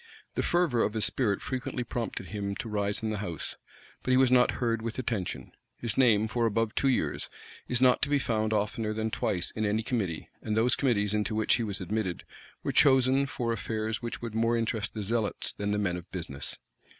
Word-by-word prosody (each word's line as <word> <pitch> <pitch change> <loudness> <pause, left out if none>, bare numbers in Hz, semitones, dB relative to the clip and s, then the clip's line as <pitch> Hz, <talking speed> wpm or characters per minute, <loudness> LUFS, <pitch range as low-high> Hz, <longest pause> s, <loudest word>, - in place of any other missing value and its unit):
The - - 0
fervor 170 -9 +2
of 105 - +1
his 110 -1 +4
spirit 105 -7 +2
frequently 130 -1 -3
prompted 115 -7 -4
him 100 -1 -3
to 115 - -5
rise 105 0 -1
in 110 - 0
the 105 - -2
house; 85 -7 -4 0.5
but - - -5
he 130 - +5
was 130 -1 +5
not 125 -1 +5
heard 115 -2 0
with 115 0 -4
attention: 115 -7 -3 0.3
his 115 -4 -2
name, 110 -5 +4
for 115 +1 +1
above 115 0 0
two 135 - +1
years, 130 - 0 0.4
is 125 0 +1
not 125 -1 +5
to 145 - +1
be 145 - +4
found 110 -5 0
oftener 110 +1 0
than 110 0 -1
twice 90 -4 -1
in 110 - -3
any 105 +1 +1
committee; 100 -9 -2
and 110 0 -1
those 120 +4 +4
committees 105 -7 +1
into 105 0 0
which 110 0 +3
he 120 - -1
was 100 -3 -2
admitted, 95 -1 -2 0.4
were - - 0
chosen 135 0 +5
for 120 -3 -1
affairs 110 0 -2
which 120 0 -5
would 115 -2 -4
more 115 +1 +2
interest 110 -1 -2
the 105 - -3
zealots 110 +1 -1
than 100 0 -3
the 105 - +1
men 95 -4 0
of 90 +1 -10
business. 80 -7 -5
110 Hz, 210 wpm, -29 LUFS, 105-120 Hz, 0.5 s, he